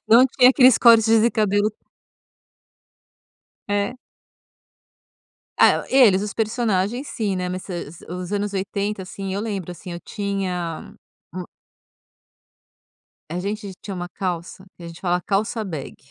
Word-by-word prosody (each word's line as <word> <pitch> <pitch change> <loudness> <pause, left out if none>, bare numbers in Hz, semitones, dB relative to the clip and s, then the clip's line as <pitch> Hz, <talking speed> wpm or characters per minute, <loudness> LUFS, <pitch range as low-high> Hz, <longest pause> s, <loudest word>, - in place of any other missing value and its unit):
Não 235 +3 +8
tinha 255 -1 +5
aqueles 255 -2 +6
cortes 230 -2 +7
de 235 +1 +3
cabelo 210 -1 +1 2.0
É. 205 +5 -1 1.6
É. - - +5
Eles, 220 -8 +5
os 210 -1 -4
personagens 225 +2 0
sim, 205 -5 -2
né, 180 0 -2
mas 185 0 -4
se 175 -5 -6
se 170 - -14
os 180 +1 -5
anos 205 0 -2
80, 200 +1 -2
assim, 190 +1 -6
eu 200 - -2
lembro, 195 -6 -4
assim, 180 +1 -9
eu 170 - -6
tinha 185 -6 -4 0.4
um 180 -1 -5 1.9
a 175 +2 -3
gente 200 0 -4
tinha 200 - -6
uma 175 0 -4
calça 185 0 -5
que 175 - -14
a - - -7
gente 165 -1 -11
fala: 180 -1 0
"Calça 215 +3 -1
Bag". 160 -8 -6
200 Hz, 140 wpm, -22 LUFS, 180-215 Hz, 2.0 s, Não